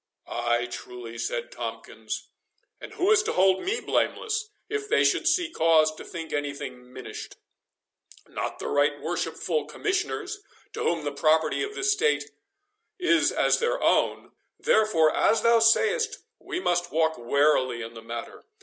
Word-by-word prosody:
"Ay, 120 0 0
truly," 120 -1 -8
said - - -3
Tomkins; - - -6 0.5
"and - - -10
who 375 +4 +2
is 430 -1 +6
to 430 - -2
hold 190 0 +3
me 415 +6 -1
blameless, 430 0 -1 0.2
if 425 0 -4
they - - +4
should 335 - +2
see 345 0 +3
cause 160 - +4
to - - -10
think 165 -2 -7
any 145 -1 -2
thing 125 -3 -9
minished? 130 0 -8 0.9
Not - - -4
the - - -5
right 145 0 +2
worshipful 165 -2 -2
Commissioners, 400 - -2 0.3
to - - -5
whom 165 -2 0
the 145 - -1
property 155 +2 +2
of 420 +1 -4
the - - -4
estate 415 +3 +1 0.7
is 340 -2 +3
as - - +2
their 485 +1 0
own; - - +1 0.3
therefore, 165 -8 +3
as 220 -1 +3
thou 235 0 +5
say'st, 445 - +3 0.2
we 380 -2 -4
must 175 - 0
walk 160 -2 +1
warily 130 -1 +2
in 115 +1 -8
the 115 - -10
matter. 115 +1 -8
170 Hz, 155 wpm, -26 LUFS, -, 0.9 s, is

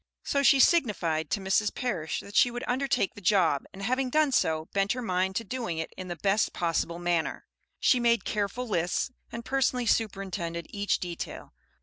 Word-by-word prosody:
So 280 - 0
she 275 0 +5
signified 180 - +2
to - - 0
Mrs. 195 +2 +1
Parish 190 - -2
that 200 - -12
she 245 - +6
would 245 +1 -5
undertake 255 -5 0
the 205 - -12
job, 175 -7 +2
and 195 - -9
having 255 +4 0
done 305 +1 +3
so, 160 -9 +1
bent 195 0 +2
her 250 - -4
mind 185 -2 0
to 230 - -1
doing 230 -7 -4
it 160 - -4
in 185 - -7
the 175 - -4
best 195 +5 +1
possible 170 0 -1
manner. 175 -2 -1 0.3
She 250 - +4
made 235 -1 +2
careful 210 +4 -2
lists, 180 +5 0 0.2
and 235 0 -7
personally 255 -2 +1
superintended 190 -7 -1
each 205 0 0
detail. 175 -2 -6
200 Hz, 185 wpm, -28 LUFS, 175-245 Hz, 0.3 s, she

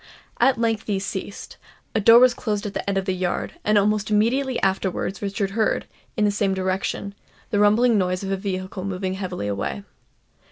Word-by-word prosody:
At 265 - +4
length 225 -2 0
these 200 -2 -1
ceased; 200 0 -6 0.4
a - - +2
door 230 +3 +7
was 250 0 +6
closed 210 -3 -3
at 205 - -4
the - - -3
end 195 - 0
of 195 - -1
the 190 - 0
yard; 180 -1 -3
and 210 0 +3
almost 210 0 +2
immediately 240 +5 +1
afterwards 190 0 -1
Richard 200 -1 -2
heard, 220 +1 0 0.3
in 210 - +3
the 205 - +3
same 200 -1 0
direction, 190 +1 -2 0.4
the 205 - +1
rumbling 215 +2 +4
noise 185 0 -1
of 195 - -3
a - - +2
vehicle 185 -1 -4
moving 190 -1 -3
heavily 185 - -4
away. 100 - -3
200 Hz, 190 wpm, -23 LUFS, 190-215 Hz, 0.4 s, door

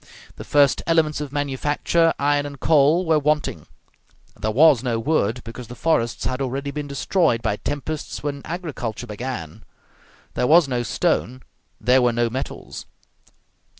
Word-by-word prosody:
The - - -7
first 145 -2 +3
elements 160 -3 +2
of 145 -2 -5
manufacture, 145 +4 +1
iron 145 0 +1
and 140 -2 -10
coal, 155 +5 +3
were 160 -2 +3
wanting; 150 - -1 0.7
there 110 +2 -3
was 140 +2 +5
no 120 -3 -1
wood, 120 -3 0
because 115 +1 -9
the 125 - -9
forests 120 -8 0
had 130 +1 -2
already 135 +2 -3
been 150 0 -5
destroyed 140 -3 +1
by 105 - 0
tempests 145 +3 -5
when 140 -1 -3
agriculture 150 - -5
began; 115 -7 -6 0.7
there 125 - 0
was 165 +1 +6
no 125 -2 -1
stone, 130 -1 -1 0.4
there 125 +3 +4
were 120 -1 +2
no 120 0 0
metals. 130 +3 -6
140 Hz, 150 wpm, -22 LUFS, 120-150 Hz, 0.7 s, was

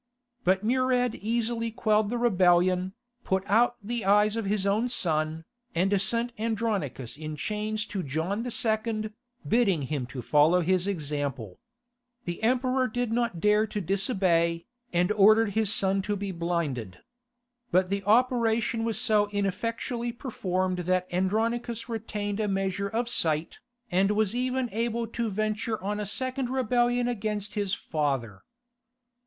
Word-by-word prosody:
But 190 +2 +2
Murad 250 0 +2
easily 230 +1 -1
quelled 215 -2 +1
the 240 - -1
rebellion, 185 -4 +3 0.3
put 190 0 0
out 235 +4 +3
the 235 +1 -3
eyes 210 +2 +4
of 225 -2 -2
his 200 0 0
own 215 +5 +1
son, 160 -6 0 0.3
and 190 +3 +2
sent 235 +4 +1
Andronicus 210 - -2
in 155 0 -6
chains 210 +6 -2
to 205 -3 -4
John 165 +9 -2
II., 220 -2 -1 0.4
bidding 200 - +2
him 135 -2 -3
to 125 -1 -7
follow 155 +8 +4
his 185 +2 +1
example. 145 - -3 0.7
The 175 -1 -4
Emperor 255 +2 +2
did 245 0 -2
not 235 -7 0
dare 210 +3 +3
to 210 - -4
disobey, 180 -3 +1 0.3
and 175 +2 +2
ordered 215 +1 +5
his 215 -1 +2
son 195 -1 +2
to 205 +2 -2
be 200 0 -4
blinded. 160 - -3 0.7
But 185 -1 +2
the 200 0 -1
operation 230 0 +2
was 225 -3 +1
so 210 -1 +3
ineffectually 230 +4 -2
performed 185 -7 -2
that 180 +1 0
Andronicus 230 +5 -1
retained 210 -3 -4
a 215 - 0
measure 195 0 -1
of 230 +2 -1
sight, 160 -8 0 0.3
and 190 +2 +3
was 210 0 +1
even 255 +1 0
able 230 +2 -1
to 230 -1 -2
venture 215 +2 -2
on 205 +1 -2
a 210 - -3
second 255 +3 0
rebellion 245 -1 +1
against 210 -3 -3
his 200 -2 -1
father. 135 -10 -2
210 Hz, 140 wpm, -27 LUFS, 180-230 Hz, 0.7 s, ordered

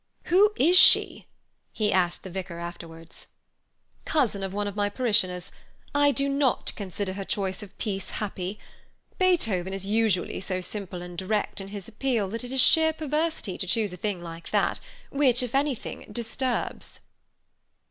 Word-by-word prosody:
"Who 400 +4 +5
is 350 +7 +5
she?" - - +6 0.4
he 210 -2 0
asked 180 -2 +1
the 190 - -8
vicar 180 -2 -5
afterwards. 165 -1 -9 0.8
"Cousin 250 -10 +1
of 195 -1 -3
one 205 +1 -2
of 205 - -5
my 205 -1 +1
parishioners. 205 -6 +1 0.4
I 290 0 +4
do 275 0 0
not 275 -2 +1
consider 195 -1 -4
her 195 +1 -5
choice 190 -1 -2
of 205 - -9
a - - -31
piece 195 -4 -4
happy. 195 -1 -4 0.6
Beethoven 225 - +2
is 195 -1 -4
so 195 - -6
usually 215 -4 +1
simple 185 -1 -4
and 175 0 -9
direct 195 +3 -2
in 195 - -7
his 200 -2 -7
appeal 230 -3 -1
that 230 +4 -4
it 245 - -7
is 265 - 0
sheer 320 +2 +6
perversity 310 - -2
to 190 - -3
choose 210 -1 +1
a - - -5
thing 190 -3 -3
like 165 0 -8
that, - - +1 0.3
which, 260 -3 +3
if 245 - -5
anything, 275 -2 -1
disturbs." 240 +3 -3
205 Hz, 165 wpm, -26 LUFS, 185-260 Hz, 0.8 s, she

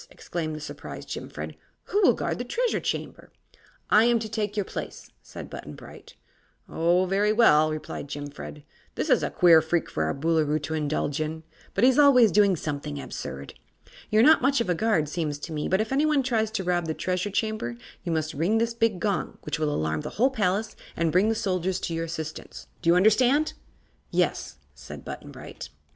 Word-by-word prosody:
exclaimed 160 -3 -5
the - - -6
surprised 150 - -8
Jimfred; - - -6 0.3
"who 410 - 0
will 370 - +5
guard - - -3
the - - -2
Treasure - - 0
Chamber?" - - -5 0.6
"I 215 +2 +6
am 240 0 +4
to 225 -1 -4
take 215 -1 -3
your 205 - +2
place," - - -7
said - - -9
Button - - -9
Bright. - - -13 0.5
"Oh, 175 +3 +2
very 200 +3 +2
well," 155 -9 +5
replied 155 -1 -5
Jimfred; 145 +1 -8 0.3
"this - - -1
is - - +5
a - - -1
queer 170 -3 +6
freak 165 +1 -1
for 80 - -1
our 80 - -1
Boolooroo 155 0 +1
to 150 +2 -3
indulge 150 -1 -1
in, 160 +1 -4 0.3
but 195 - +1
he 255 - +8
is 260 - +1
always 250 -7 +7
doing 200 -2 +4
something 145 -2 -4
absurd. 70 - -7 0.6
You're 215 +1 +4
not 315 +4 +6
much 275 +1 +3
of 230 -6 0
a - - +4
guard, 175 -5 +1
seems 150 -2 -2
to 160 +3 -7
me, 150 -1 -2
but 190 +2 +2
if 220 - -4
anyone 290 0 +2
tries 225 -4 0
to 215 -3 -3
rob 175 -2 0
the 160 - -2
Treasure 185 +2 -2
Chamber 215 - -2 0.3
you 175 - -3
must 155 -1 -1
ring 170 +10 +1
this 230 +1 0
big 225 -5 +1
gong, 200 0 -2
which - - -3
will 155 -1 +1
alarm 80 - -1
the - - -5
whole 255 +5 +4
palace 210 -2 -1 0.2
and 165 -1 +1
bring 185 +6 +3
the 225 - +1
soldiers 185 -3 -1
to 170 - -3
your 165 0 -2
assistance. 160 -1 -7 0.2
Do 165 - +1
you 170 - +6
understand?" 250 +10 +4 0.6
"Yes," - - -1 0.2
said - - -11
Button - - -8
Bright. - - -9
180 Hz, 200 wpm, -26 LUFS, 155-220 Hz, 0.6 s, he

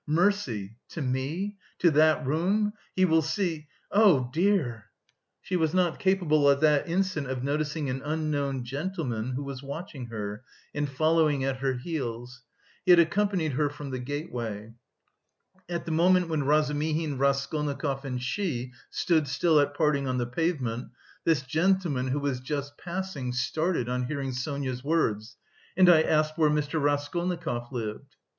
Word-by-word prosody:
"Mercy! 150 - +1
to - - -7
me... 145 +10 -2 0.2
to 170 - +4
that 155 0 +4
room... 190 +9 +1 0.2
he 185 - +4
will 160 -2 +4
see... 160 -2 -2 0.2
oh, 190 - +5
dear!" 155 - +1 0.6
She 185 - -2
was 160 -1 +1
not 180 -3 +2
capable 165 -7 +3
at 140 0 +4
that 150 +1 +3
instant 180 -5 0
of 130 -1 -3
noticing 150 +1 -1
an 130 +1 -3
unknown 145 -3 -1
gentleman 130 - -3
who 135 +3 -3
was 140 -2 -6
watching 140 -1 -7
her 105 0 -5 0.3
and 145 -1 -1
following 155 0 +2
at 135 -1 -1
her 135 0 0
heels. 125 -3 -5 0.4
He 185 - +4
had 175 - +7
accompanied 175 -1 +2
her 145 +2 +1
from 145 -1 -8
the 130 - -3
gateway. 120 -6 -5 1.0
At 170 -1 -3
the 170 - -3
moment 180 +2 +3
when 155 -3 0
Razumihin, 150 0 +1
Raskolnikov, 140 0 0
and 130 -2 -3
she 130 -2 -2 0.2
stood 160 -4 +1
still 150 +3 +3
at 145 0 +1
parting 145 -3 +1
on 130 0 0
the 120 - 0
pavement, 130 -3 -2 0.4
this 155 -5 +3
gentleman, 160 -2 +1
who 135 +3 0
was 140 -3 -1
just 140 +2 -4
passing, 175 -8 -4
started 145 +2 0
on 125 0 -1
hearing 135 0 -3
Sonia's 130 0 -3
words: 120 -8 0 0.4
"and 185 -1 +7
I 170 -3 +7
asked 155 0 +1
where 155 -2 +5
Mr. 150 +1 0
Raskolnikov 145 -3 -1
lived?" 125 +4 -5
145 Hz, 150 wpm, -27 LUFS, 130-165 Hz, 1.0 s, had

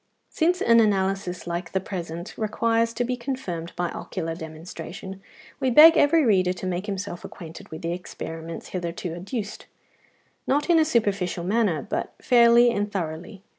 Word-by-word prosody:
Since 355 +3 +1
an 230 0 +6
analysis 195 -4 0
like 175 0 -4
the 190 - +2
present 175 -2 -6
requires 230 +1 +1
to 245 - 0
be 250 +1 -1
confirmed 235 -10 -5
by 175 -1 -1
ocular 165 -3 -4
demonstration, 165 +4 -8 0.4
we 260 - +1
beg 315 +6 +9
every 315 0 +4
reader 185 -5 +3
to 185 - -7
make 185 +2 -3
himself 195 -3 -5
acquainted 165 -2 -10
with 160 - -8
the 170 +1 -1
experiments 165 -2 -7
hitherto 175 -1 -4
adduced, 200 +4 -6 0.8
not 295 +5 +2
in 330 - +6
a 315 - +4
superficial 200 - 0
manner, 190 - +1
but - - -3
fairly 240 0 +5
and 205 -2 -2
thoroughly. 175 +2 -5
195 Hz, 155 wpm, -25 LUFS, 175-235 Hz, 0.8 s, beg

